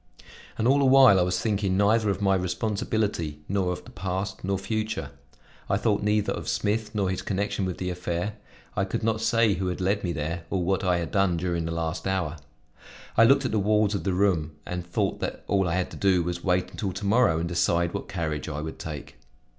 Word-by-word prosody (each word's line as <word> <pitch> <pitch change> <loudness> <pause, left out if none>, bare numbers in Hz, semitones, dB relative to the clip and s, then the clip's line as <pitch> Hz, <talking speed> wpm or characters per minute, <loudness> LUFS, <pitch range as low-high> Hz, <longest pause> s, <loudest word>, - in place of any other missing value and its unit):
And 110 - +1
all 140 +2 +5
the 140 - +3
while 130 -7 +7
I - - +4
was 90 0 +1
thinking 100 -2 0
neither 105 +2 +3
of 100 +1 -1
my 95 -1 +4
responsibility, 95 -4 -1
nor 95 -2 0
of 90 - -6
the - - -12
past, 95 +3 -4
nor 95 +1 0
future; 110 +3 -3 0.6
I 100 - +3
thought 105 -1 +1
neither 105 0 +1
of - - -5
Smith 110 +1 -1
nor 100 -2 +1
his 95 0 -2
connection 100 0 -1
with 90 -2 -3
the 90 -1 -2
affair; 90 +3 -3 0.4
I 95 - +1
could 110 +4 -3
not 110 0 0
say 115 -2 +3
who 95 0 -2
had 90 - -3
led 100 +2 0
me 90 - -1
there, 85 +2 -3
or 95 -2 0
what 95 +2 0
I 90 -1 +2
had 85 -1 -3
done 95 -4 +2
during 85 -1 -1
the 80 - -3
last 85 +2 -3
hour. 90 -5 -1 0.8
I 115 - +7
looked 135 +2 +4
at - - 0
the 110 - +1
walls 105 +1 +2
of 100 - -2
the 95 - 0
room 90 -6 +1
and 90 -1 -4
thought 85 0 -1
that - - -4
all 95 -2 +1
I 85 - 0
had 95 -1 -1
to - - -8
do 95 -3 +3
was 85 0 -3
to 90 - -9
wait 90 0 +1
until 95 -3 -3
to 100 +3 -5
morrow 100 -5 +4
and 85 +1 -1
decide 85 0 +1
what 100 - -4
carriage 80 -6 -3
I 75 -1 -4
would 80 +1 -6
take. 75 -3 -7
95 Hz, 230 wpm, -26 LUFS, 85-105 Hz, 0.8 s, while